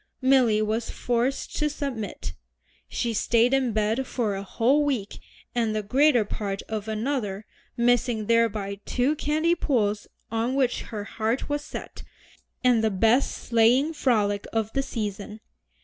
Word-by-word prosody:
Milly 255 -5 +4
was 220 +2 -1
forced 245 +2 -1
to 300 - +1
submit. 275 -8 -5 0.5
She 235 -2 -2
stayed 235 +3 +2
in 265 -3 +2
bed 220 +4 0
for 225 -5 -1
a 195 - -4
whole 245 +9 +2
week 255 -9 -2 0.3
and 230 -3 0
the 215 - -1
greater 255 +1 +3
part 200 -1 -4
of 215 -1 -5
another, 215 -3 -2 0.3
missing 240 -2 +2
thereby 210 -3 +1
two 260 +5 +1
candy 310 +3 +1
pulls 215 -11 0 0.2
on 230 +3 0
which 260 -3 +1
her 210 -3 -4
heart 225 +5 -2
was 290 0 -1
set, 300 - -8 0.6
and 245 -3 +4
the 220 - +3
best 225 +6 +3
sleighing 240 +7 +2
frolic 210 -8 +1
of 220 -1 -1
the 275 - +1
season. 210 -4 -5
230 Hz, 145 wpm, -25 LUFS, 215-265 Hz, 0.6 s, Milly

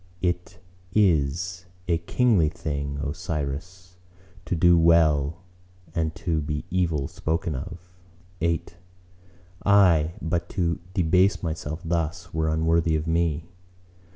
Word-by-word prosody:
— 90 - -31
It 90 +2 -21 0.4
is 90 -1 +1 0.2
a 85 -2 +2
kingly 95 -2 +2
thing, 70 -2 -4
O 70 - -1
Cyrus, 85 +3 -5 0.5
to 90 - -1
do 85 +1 +5
well 80 -1 +3 0.5
and 80 -1 -1
to 80 -3 -1
be 75 +1 -3
evil 85 -6 0
spoken 80 0 -2
of. 80 +6 -5 0.6
VIII 85 0 +1 1.0
"Aye, 90 -6 +5
but 85 +1 -2
to 85 -3 +1 0.2
debase 90 +1 +3
myself 80 -1 -4
thus 85 +2 -2
were 80 0 0
unworthy 80 +1 +2
of 75 0 -1
me." 80 -1 0
85 Hz, 120 wpm, -25 LUFS, 80-90 Hz, 1.0 s, do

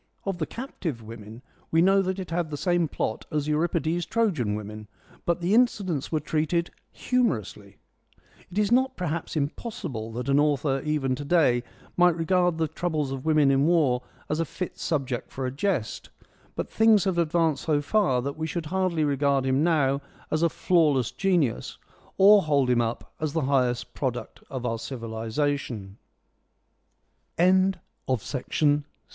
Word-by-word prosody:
Of 195 -3 -2
the 155 - -1
Captive 170 - -5
Women 110 +2 -10 0.3
we 165 - +2
know 195 +1 +5
that 190 0 -2
it 185 -3 -6
had 170 -1 -1
the 145 - -4
same 175 0 +1
plot 110 - -3
as 150 -1 -1
Euripides' 165 +2 0
Trojan 170 - 0
Women, 105 0 -7 0.4
but 170 0 +1
the 175 +4 +1
incidents 200 - +1
were 155 - +1
treated 160 +3 -1
— - - -46
humorously. 105 - -1 0.7
It 180 - -9
is 210 0 +2
not, 260 +2 +2
perhaps, 170 -3 -3
impossible 145 - -4
that 125 +2 -4
an 140 +1 +4
author 145 -2 +1
even 150 -3 0
to 140 +3 -4
day 145 -6 +3 0.3
might 175 -1 +4
regard 175 0 +2
the 160 -1 +1
troubles 155 -4 -2
of 135 +1 -5
women 155 -3 +4
in 135 +2 +3
war 145 -8 +3 0.3
as 155 - -1
a 165 - +1
fit 180 +3 -6
subject 135 -6 -2
for 130 - -4
a 125 - -2
jest; 140 - -2 0.5
but - - -4
things 220 -2 +5
have 190 -3 0
advanced 165 -3 +1
so 150 -3 +2
far 145 - +1
that 140 +1 -3
we 160 0 -2
should 165 0 -4
hardly 180 -1 0
regard 140 -2 +1
him 135 +2 +2
now 145 -5 +2 0.3
as 155 - +1
a 170 - +4
flawless 150 -9 +2
genius, 175 - 0 0.4
or 200 +1 +7
hold 140 -6 +2
him 120 -1 +3
up 115 0 -4
as 155 -2 -2
the 160 - 0
highest 125 -3 0
product 125 -3 -4
of 130 -2 -5
our 115 -1 -1
civ 120 -1 -6
155 Hz, 160 wpm, -26 LUFS, 135-175 Hz, 0.7 s, or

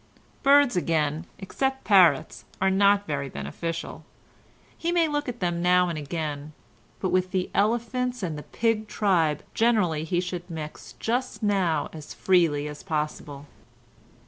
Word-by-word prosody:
Birds 280 -4 +5
again, 160 -2 0
except 265 +7 -2
parrots, 180 -9 +4 0.2
are 190 0 +2
not 200 +1 +4
very 140 -2 -3
beneficial; 165 - -5 0.7
he 335 - -2
may 340 -2 +3
look 290 -2 -2
at 240 -2 -7
them 175 -1 -1
now 180 0 +4
and 170 - -3
again, 150 0 -4 0.5
but 185 - -1
with 185 0 +1
the 185 -1 -2
elephants 240 +3 0
and 165 -4 -2
the 150 - -6
pig 220 +4 -1
tribe 170 -9 +1
generally 205 -10 +2
he 175 +2 0
should 180 0 -5
mix 155 -2 -7
just 245 +1 -2
now 185 -7 +1
as 155 -2 -9
freely 165 -6 +2
as 150 0 -8
possible. 150 -3 -4
180 Hz, 145 wpm, -26 LUFS, 155-215 Hz, 0.7 s, Birds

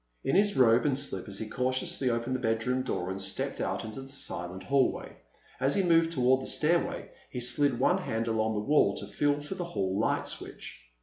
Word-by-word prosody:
In 135 - 0
his 205 +1 +3
robe 125 +1 +5
and 135 -2 +1
slippers 100 -8 -2
he 110 - -4
cautiously 130 +2 0
opened 120 +2 -1
the - - -2
bedroom 125 +2 0
door 95 -8 -3
and 95 +1 -4
stepped 95 0 -1
out - - -2
into 110 +4 -7
the 135 - -11
silent 95 -8 -5
hallway. 140 -1 0 0.4
As 135 +2 +2
he 195 - +2
moved 165 -2 +4
toward 130 -3 +3
the - - -4
stairway 165 +3 0 0.2
he 125 - -5
slid 130 +3 +1
one 180 +9 +3
hand 115 -10 -2
along 110 -1 0
the 105 - -1
wall 145 -9 +3
to - - -5
feel 145 +8 0
for 145 +6 -6
the 185 -2 -4
hall 100 - -2
light 110 - 0
switch. - - -7
130 Hz, 205 wpm, -29 LUFS, 110-145 Hz, 0.4 s, robe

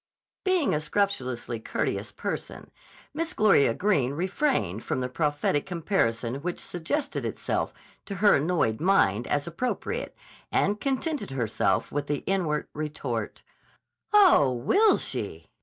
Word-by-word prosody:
Being 370 -6 +2
a 150 - 0
scrupulously 130 - -1
courteous - - -2
person - - -5 0.4
Miss 330 +3 -2
Gloria 140 - +4
Greene 150 -11 +1
refrained 180 - 0
from - - -2
the 125 - -1
prophetic 145 +3 0
comparison 135 - 0
which 175 +5 -4
suggested 280 - -2
itself - - -2 0.4
to 200 - -4
her 205 +2 +5
annoyed 145 -7 0
mind 120 - +3
as 145 -1 0
appropriate, 250 - -3 0.4
and 210 +1 +1
contented 280 - -1
herself 120 -5 0
with 145 0 -2
the 145 -1 -2
inward 170 -6 0
retort: 140 -7 -4 0.7
"Oh, 370 - +6
will 390 - +3
she! - - -5
160 Hz, 125 wpm, -27 LUFS, 130-210 Hz, 0.7 s, Oh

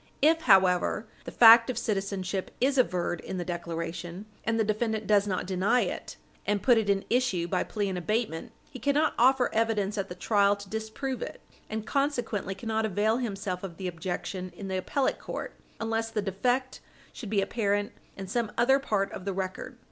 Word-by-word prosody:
If, 325 +2 +5
however, 190 - +4 0.2
the - - -6
fact 230 0 +8
of 255 - -2
citizenship 195 -2 -2
is 270 +2 +2
averred 175 -7 +1
in 190 - -5
the 175 - -3
declaration, 170 +2 -5 0.2
and 225 0 0
the - - +4
defendant 220 0 -1
does 205 -1 +3
not 185 -2 -1
deny 190 +6 +2
it - - -4 0.3
and 205 -1 0
put 245 -3 +5
it 210 -2 -2
in 195 -1 +1
issue 230 -9 +1
by 180 +1 0
plea 205 -2 -2
in 190 -1 -2
abatement, 210 -2 -2 0.2
he 255 - -8
cannot 285 +3 +2
offer 255 +1 +4
evidence 215 -2 0
at 195 - -3
the 180 - -6
trial 200 +2 +3
to 200 0 -11
disprove 220 +4 -4
it, - - -6 0.3
and 220 0 -4
consequently 245 -9 -1
cannot 220 +2 -2
avail 215 +2 +1
himself 200 -6 -3
of 180 -4 -7
the 190 - -4
objection 180 +2 -4
in 195 -2 -7
the 190 - -1
appellate 270 +8 0
court - - -6 0.3
unless 225 0 -1
the 220 -2 -2
defect 245 +7 -1 0.3
should 225 - -7
be 210 -1 +2
apparent 205 0 0 0.3
in 195 - -5
some 220 +3 -1
other 265 +3 +4
part 205 -7 -1
of - - -7
the 200 - -1
record. 190 0 -5
205 Hz, 185 wpm, -28 LUFS, 190-230 Hz, 0.3 s, fact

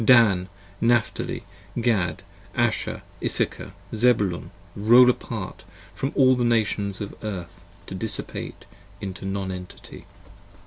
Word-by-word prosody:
50 115 - +5
Dan: 95 -7 +5 0.3
Napthali: 120 -1 +1 0.4
Gad: 95 -9 +1 0.3
Asher: - - 0 0.2
Issachar: - - -1 0.2
Zebulun: 105 -6 +2 0.3
roll 120 +4 +7
apart 110 -7 -6 0.3
From 135 - -2
all 130 -1 +6
the 125 - 0
Nations 105 -4 +1
of 100 - -4
the 110 - -5
Earth 85 -4 -6 0.2
to - - -7
dissipate - - -4 0.3
into 95 -1 -6
Non 95 -1 -2
Entity. 90 0 -9
105 Hz, 120 wpm, -25 LUFS, 95-120 Hz, 0.4 s, roll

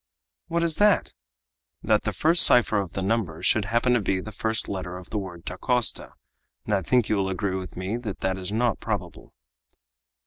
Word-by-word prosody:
"What 170 0 0
is 165 -2 0
that?" 210 0 +3 0.7
"That - - +2
the - - 0
first 165 +2 +5
cipher 115 -3 +5
of 95 -4 -5
the 95 - -3
number 95 -6 -1
should 110 -3 +2
happen 115 +3 +1
to 120 - +3
be 95 -1 0
the 110 +3 -7
first 110 +1 -1
letter 90 -2 -5
of 90 - -12
the 105 - -1
word 90 -3 -9
Dacosta, 120 +6 -1 0.5
and 105 - -1
I 100 - +2
think 125 +2 +2
you 105 - +1
will 95 -1 0
agree 95 0 -2
with 95 -1 -6
me 95 +5 -3
that 110 -5 -6
that 95 0 -1
is 95 +1 -4
not 115 0 0
probable." - - -5
105 Hz, 200 wpm, -25 LUFS, 95-120 Hz, 0.7 s, first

